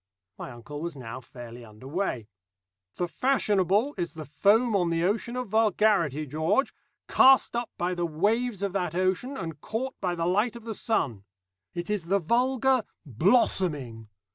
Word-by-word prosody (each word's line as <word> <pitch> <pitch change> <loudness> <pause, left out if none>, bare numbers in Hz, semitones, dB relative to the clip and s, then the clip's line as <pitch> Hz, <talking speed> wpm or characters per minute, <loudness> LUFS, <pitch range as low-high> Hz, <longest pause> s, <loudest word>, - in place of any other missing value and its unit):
My - - -6
uncle 135 +5 -9
was 170 -1 -4
now 125 -2 -7
fairly 120 -1 -11
under 110 +3 -13
way. 140 - -2 0.7
"The 175 - -1
fashionable 210 - +1
is 170 -3 -2
the 160 -2 -8
foam 205 - +3
on 175 -3 +2
the 165 0 0
ocean 220 +5 -1
of 250 -3 -4
vulgarity, 205 - +2
George, 160 - 0 0.3
cast 265 -2 +5
up 240 0 -2
by 175 +1 -1
the 175 -1 -1
waves 205 +6 0
of 200 -2 -1
that 180 -4 -2
ocean, 185 +9 0
and 165 - -6
caught 260 +5 -3
by 180 -2 -1
the 165 -1 -2
light 210 +7 +1
of 235 - -10
the 225 -1 -5
sun. 140 - -1 0.5
It 175 0 -4
is 205 -6 -2
the 195 +3 +3
vulgar 255 +6 +2 0.2
blossoming. 145 - +1
185 Hz, 165 wpm, -27 LUFS, 155-225 Hz, 0.7 s, cast